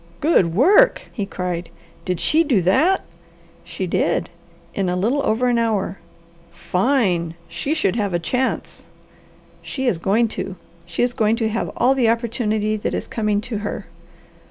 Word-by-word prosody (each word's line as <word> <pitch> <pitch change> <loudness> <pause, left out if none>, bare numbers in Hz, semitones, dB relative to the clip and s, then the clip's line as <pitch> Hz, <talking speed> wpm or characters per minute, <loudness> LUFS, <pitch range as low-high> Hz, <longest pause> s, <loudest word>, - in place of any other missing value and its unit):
"Good 185 - +3
work!" 405 - +5
he 205 -5 -3
cried. 180 -3 -4 0.4
"Did 180 -3 -1
she 320 +2 +3
do 245 - +2
that?" 305 - +3 0.6
"She - - -5
did. - - 0 0.4
In 195 -2 -1
a 180 - 0
little 230 +10 +1
over 240 +3 +1
an 240 -1 +2
hour." 210 -5 -1 0.5
"Fine! 180 - 0
She 170 - -2
should 210 - +1
have 205 -3 0
a - - +4
chance." 250 +9 -2 0.8
"She 265 -1 -4
is 205 -10 +1
going 210 +6 +2
to. 190 - -5 0.3
She 175 +6 -1
is 245 0 +1
going 220 -2 +2
to 225 -2 0
have 225 +2 -2
all 260 - +4
the 250 -4 +2
opportunity 220 -2 0
that 210 - -2
is - - -4
coming 210 -2 0
to 215 -1 -4
her." 205 - -5
215 Hz, 160 wpm, -21 LUFS, 185-250 Hz, 0.8 s, work